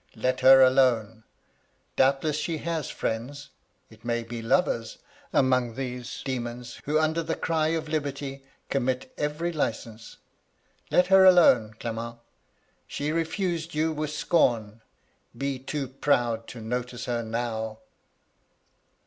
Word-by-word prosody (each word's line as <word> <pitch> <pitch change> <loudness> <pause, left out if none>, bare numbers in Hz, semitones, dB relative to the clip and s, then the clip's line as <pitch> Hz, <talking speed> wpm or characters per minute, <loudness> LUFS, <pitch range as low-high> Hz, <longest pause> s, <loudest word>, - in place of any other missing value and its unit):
Let 130 0 0
her 130 +1 +8
alone 120 -4 +2
I - - -43 0.7
Doubtless 135 +3 +2
she 160 +2 -2
has 160 -2 -3
friends 140 +6 -4 0.2
— - - -43
it 110 0 -18
may 120 0 -1
be 115 0 -6
lovers 115 -4 0 0.2
— - - -28
among 125 -3 +2
these 125 -2 -5
demons, 120 -2 -5
who, 150 +2 +1
under 155 +1 +1
the 165 0 -2
cry 160 -1 0
of 160 - -5
liberty, 140 -3 -4 0.2
commit 130 -1 -2
every 150 +4 -2
licence. 115 -5 -4 0.7
Let 180 - +4
her 190 0 +8
alone, 130 - +6
Clement 115 0 -5
I - - -30 0.7
She 145 +1 -3
refused 165 0 -2
you 160 +1 +1
with 155 -1 -3
scorn: 115 -9 +1 0.6
be 135 -1 -2
too 135 +1 -4
proud 120 -4 0
to 120 - -9
notice 125 +1 -4
her 120 -1 -1
now.' 110 -1 -3
130 Hz, 135 wpm, -26 LUFS, 115-155 Hz, 0.7 s, her